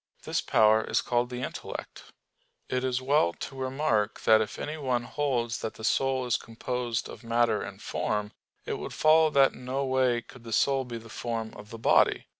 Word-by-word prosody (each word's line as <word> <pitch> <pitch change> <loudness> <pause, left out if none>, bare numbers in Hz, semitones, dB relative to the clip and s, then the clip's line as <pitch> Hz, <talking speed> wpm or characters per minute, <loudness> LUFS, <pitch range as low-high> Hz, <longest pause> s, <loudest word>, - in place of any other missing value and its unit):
This - - -1
power 110 0 +4
is - - +1
called 120 0 0
the 125 0 -5
intellect. - - -7 0.6
It 125 0 -1
is 130 0 -1
well 135 - +3
to 135 - -7
remark 130 -5 0
that 110 0 +5
if 110 - -4
anyone 135 -5 -2
holds 120 -4 -1
that 110 - -5
the 110 - -11
soul 130 +2 +1
is 125 0 +1
composed 120 0 -3
of - - -11
matter 115 +1 +2
and - - -7
form, 105 0 -2 0.3
it - - -3
would - - -6
follow 155 0 +5
that 140 -2 +4
in 125 - -12
no 135 +2 -1
way 130 -3 +2
could 120 +1 -15
the 115 -1 -6
soul 135 +3 +2
be 120 -1 -6
the 115 0 -11
form 115 -1 -4
of 105 0 -11
the 115 - -8
body. 110 - +3
125 Hz, 195 wpm, -28 LUFS, 115-130 Hz, 0.6 s, that